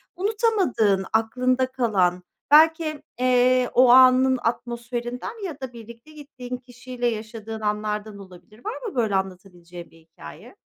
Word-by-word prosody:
unutamadığın, 370 - +1
aklında 255 +3 0
kalan, 190 -8 0 0.3
belki, 315 0 +4 0.2
eee, 255 0 +3
o 250 0 +5
anın 255 0 +6
atmosferinden 240 - -4
ya 305 -6 -7
da 255 -2 -7
birlikte 235 +5 -13
gittiğin 265 -4 -8
kişiyle 245 0 -6
yaşadığın 220 -1 -6
anlardan 210 0 -3
olabilir. 195 - -16
Var 445 +4 -5
mı - - -15
böyle 220 -5 0
anlatabileceğin 180 -2 -6
bir - - -20
hikâye? 160 - -14
240 Hz, 125 wpm, -23 LUFS, 210-260 Hz, 0.3 s, anın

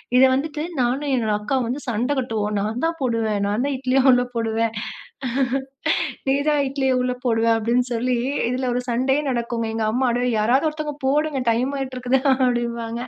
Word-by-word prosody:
இத 255 - +7
வந்துட்டு 300 +3 -2 0.2
நானும் 270 +4 0
என்னோட 225 -4 +1
அக்காவும் 250 +4 -1
வந்து 270 +4 -3
சண்டை 240 +5 0
கட்டுவோம். 215 -4 -2
நான் 220 +6 -2
தான் 330 0 -1
போடுவேன், 225 -4 0
நான் 210 +5 0
தான் 285 - -1
இட்லிய 260 0 +2
உள்ளே 250 0 +3
போடுவேன். 225 0 0 1.6
நீ 270 - +4
தான் 295 -1 +3
இட்லிய 265 -1 0
உள்ளே 250 0 0
போடுவ 225 -2 +2
அப்படின்னு 235 +3 +1
சொல்லி, 245 +1 0 0.3
இதில 255 +1 -1
ஒரு 250 - -1
சண்டையே 265 +4 +1
நடக்குங்க. 235 -2 -2
எங்க 225 -1 -1
அம்மா, 255 +2 +1
"அடோய் 245 -1 0
யாராது 255 +8 +3
ஒருத்தவங்க 305 -1 -5
போடுங்க. 295 0 +1
டைம் 245 +4 0
ஆயிட்டுருக்குது" 260 -1 0
அப்படிம்பாங்க. 235 -3 -1
250 Hz, 165 wpm, -22 LUFS, 230-265 Hz, 1.6 s, இத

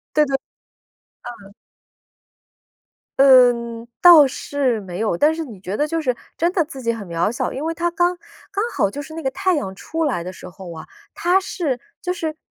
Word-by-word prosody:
对 300 - +5
对。 275 -1 -1 1.1
嗯。 200 - -16 1.7
嗯， 240 -3 +5
倒 340 -5 +9
是 265 -3 -1
没 180 -2 -7
有， 220 -5 0
但 300 - +3
是 325 -1 -4
你 215 -8 -11
觉 195 +2 -5
得 295 - +1
就 330 +1 -1
是 255 -5 0 0.2
真 340 +2 +1
的 350 -4 +1
自 275 -3 -9
己 230 - 0
很 220 -5 -6
渺 170 +5 0
小， 245 - -3
因 270 - -5
为 325 +1 -1
它 345 +1 -1
刚 350 +1 +1 0.3
刚 400 +1 -1
好 200 - +1
就 290 +8 -6
是 315 - -11
那 325 - -6
个 265 - 0
太 370 +7 0
阳 190 -11 -3
出 325 +11 -3
来 210 - -1
的 185 +1 -7
时 185 - -11
候 175 -1 -10
啊， 160 - -10 0.3
它 360 +2 +2
是 320 -9 -3 0.2
就 360 - -2
是 320 -3 -3
275 Hz, 210 characters per minute, -21 LUFS, 220-325 Hz, 1.7 s, 倒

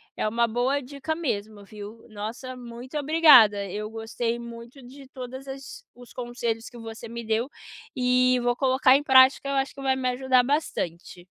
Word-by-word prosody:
é - - -1
uma 235 +2 +1
boa 245 +5 0
dica 280 +3 -5
mesmo, 215 -9 -4
viu? 210 +2 -11
Nossa, 225 +5 -7
muito 245 +2 -10
obrigada, 275 -10 +6
eu 210 +2 -5
gostei 225 +1 -3
muito 235 +2 -10
de 270 +2 -13
todas 260 +1 -9
as 270 0 -9
os 245 0 -15
conselhos 240 -2 -4
que 245 - -13
você 225 0 -9
me 235 0 -6
deu 225 +4 -1 0.5
e 250 0 +3
vou 245 0 +1
colocar 260 0 +4
em 280 - +2
prática, 265 0 +5
eu 275 - -1
acho 270 0 -1
que 275 - -10
vai 265 -1 +1
me 260 -1 -2
ajudar 255 0 +2
bastante. 180 - -3
245 Hz, 175 wpm, -25 LUFS, 225-265 Hz, 0.5 s, obrigada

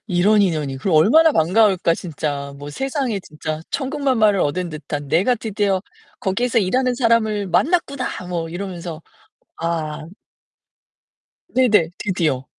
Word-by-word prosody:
이런 200 +3 +3
인연이 150 -7 -1
그럼 165 +5 -1
얼마나 310 - +6
반가울까, 185 0 +3
진짜. 145 -4 -4
뭐 145 +1 -8
세상에 265 - -2
진짜 155 -2 -6
천군만마를 260 -8 +1
얻은 175 +5 -1
듯한 145 -2 -6
"내가 190 - +3
드디어 205 -4 -1 0.4
거기에서 235 +5 +1
일하는 250 +6 +1
사람을 225 -4 +1
만났구나." 280 - +1 0.2
뭐 170 -2 -3
이러면서 175 -2 -6 0.6
아 160 -2 -3 1.4
네네. 220 -10 +3
드디어. 160 -9 -1
190 Hz, 290 characters per minute, -20 LUFS, 160-230 Hz, 1.4 s, 얼마나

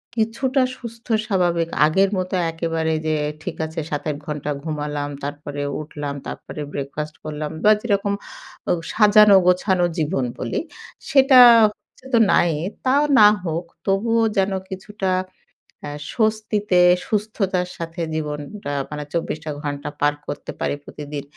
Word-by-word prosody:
কিছুটা 255 +4 +1 0.2
সুস্থ 230 -1 -10 0.2
স্বাভাবিক 175 -5 +1 0.2
আগের 190 +5 +3
মতো 185 0 -2 0.2
একেবারে 165 -1 -1
যে 155 - +1 0.3
ঠিক 180 - -5
আছে 160 +1 -6
৭-৮ 150 0 -3
ঘন্টা 150 -1 -3
ঘুমালাম, 150 -2 -3
তারপরে 145 0 -5 0.2
উঠলাম, 145 -2 -6
তারপরে 150 - -7
ব্রেকফাস্ট 150 +2 -5
করলাম 150 0 -4
বা 215 - +7
যেরকম 200 -3 0 0.6
ও - - +4 0.2
সাজানো-গোছানো 195 -4 +5
জীবন 150 -4 0
বলি - - -2 0.5
সেটা 270 -2 +7 0.3
হচ্ছে 210 +4 -7
তো - - +6
নাই 170 - +4 0.3
তাও 275 +3 +4 0.2
না 210 - +9 0.2
হোক 165 0 -3 0.2
তবুও 225 +4 +2
যেন 195 +1 +2 0.2
কিছুটা 190 0 -4 0.8
আ - - -4 0.2
স্বস্তিতে, 215 -4 +1 0.3
সুস্থতার 200 -4 -1
সাথে 165 +1 -6
জীবনটা 150 +2 -5 0.2
মানে 150 -1 -5
২৪টা 155 -2 -3
ঘণ্টা 145 0 -4
পার 145 0 +3
করতে - - -5
পারি - - -1
প্রতিদিন। 145 -1 -7
175 Hz, 125 wpm, -21 LUFS, 150-210 Hz, 0.8 s, না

